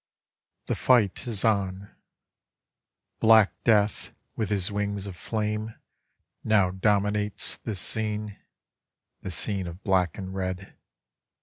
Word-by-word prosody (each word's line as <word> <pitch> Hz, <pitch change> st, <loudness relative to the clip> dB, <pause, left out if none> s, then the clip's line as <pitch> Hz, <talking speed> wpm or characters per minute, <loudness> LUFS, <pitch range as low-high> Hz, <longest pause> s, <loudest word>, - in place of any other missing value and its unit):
The -, -, -1 dB
fight 120 Hz, -1 st, +2 dB
is 110 Hz, -4 st, -1 dB
on 100 Hz, -2 st, 0 dB, 1.3 s
Black 110 Hz, -2 st, +6 dB
death 105 Hz, -2 st, +2 dB, 0.3 s
with 110 Hz, -3 st, -2 dB
his 100 Hz, 0 st, 0 dB
wings 100 Hz, -1 st, -2 dB
of 100 Hz, -3 st, -7 dB
flame 105 Hz, +2 st, -3 dB, 0.7 s
Now 100 Hz, -4 st, +3 dB
dominates 105 Hz, +1 st, +1 dB
this 105 Hz, -4 st, -5 dB
scene, 105 Hz, -2 st, -2 dB, 0.9 s
This 90 Hz, -3 st, -3 dB
scene 95 Hz, -1 st, 0 dB
of 85 Hz, +3 st, -9 dB
"black 90 Hz, -4 st, +1 dB
and 95 Hz, -1 st, -6 dB
red. 95 Hz, 0 st, -4 dB
100 Hz, 110 wpm, -26 LUFS, 95-105 Hz, 1.3 s, Black